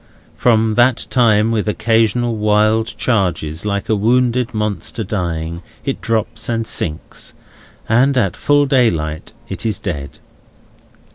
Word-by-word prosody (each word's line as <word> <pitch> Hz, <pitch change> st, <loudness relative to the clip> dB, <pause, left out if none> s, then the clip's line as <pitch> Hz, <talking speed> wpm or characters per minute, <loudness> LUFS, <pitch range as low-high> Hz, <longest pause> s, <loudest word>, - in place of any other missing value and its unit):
From 110 Hz, -2 st, +2 dB
that 120 Hz, 0 st, +3 dB
time, 110 Hz, -3 st, +3 dB
with 110 Hz, -2 st, -1 dB
occasional 115 Hz, +2 st, +1 dB
wild 110 Hz, +1 st, +2 dB
charges, 90 Hz, -, -1 dB
like 100 Hz, -1 st, -2 dB
a 110 Hz, -, +2 dB
wounded 125 Hz, +3 st, +1 dB
monster 105 Hz, 0 st, -3 dB
dying, 85 Hz, -4 st, -3 dB, 0.2 s
it -, -, -3 dB
drops 115 Hz, 0 st, -2 dB
and 115 Hz, -1 st, -1 dB
sinks; 80 Hz, -6 st, -4 dB, 0.5 s
and 130 Hz, +4 st, +3 dB
at 100 Hz, -8 st, +1 dB
full 145 Hz, 0 st, +3 dB
daylight 85 Hz, -, 0 dB
it -, -, -5 dB
is 110 Hz, -4 st, -1 dB
dead. 70 Hz, -1 st, -5 dB
110 Hz, 125 wpm, -17 LUFS, 95-120 Hz, 0.5 s, that